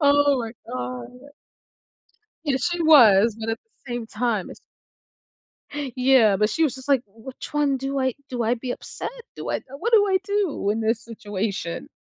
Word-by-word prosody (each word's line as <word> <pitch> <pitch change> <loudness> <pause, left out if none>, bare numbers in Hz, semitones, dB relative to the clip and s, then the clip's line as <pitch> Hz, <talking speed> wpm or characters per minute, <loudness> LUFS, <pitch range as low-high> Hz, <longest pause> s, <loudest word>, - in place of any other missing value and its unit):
Oh, 285 -1 +4
my 225 -1 -5
God. 125 -1 -5 1.4
Yes, 275 +1 +1
she 345 -1 -1
was, 230 -9 +7
but 225 0 -3
at 225 - -2
the 440 - -12
same 240 -2 -4
time, 220 -3 -1
it's - - -12 1.4
Yeah, 250 -6 +5
but 210 +2 +2
she 325 - 0
was 275 -5 +2
just 260 +1 -11
like, 270 -3 +4
"Which 230 +8 -10
one 290 -2 +2
do 270 +1 -3
I 260 -2 0
do 245 -2 -2
I 230 +2 +2
be 245 +1 -6
upset? - - -5 0.3
Do - - -5
I - - -1 0.2
what 465 +7 -2
do 415 -2 +6
I 380 -1 +3
do 400 - 0
in 220 +2 -1
this 225 +1 +1
situation?" 205 -5 -4
245 Hz, 175 wpm, -24 LUFS, 220-285 Hz, 1.4 s, was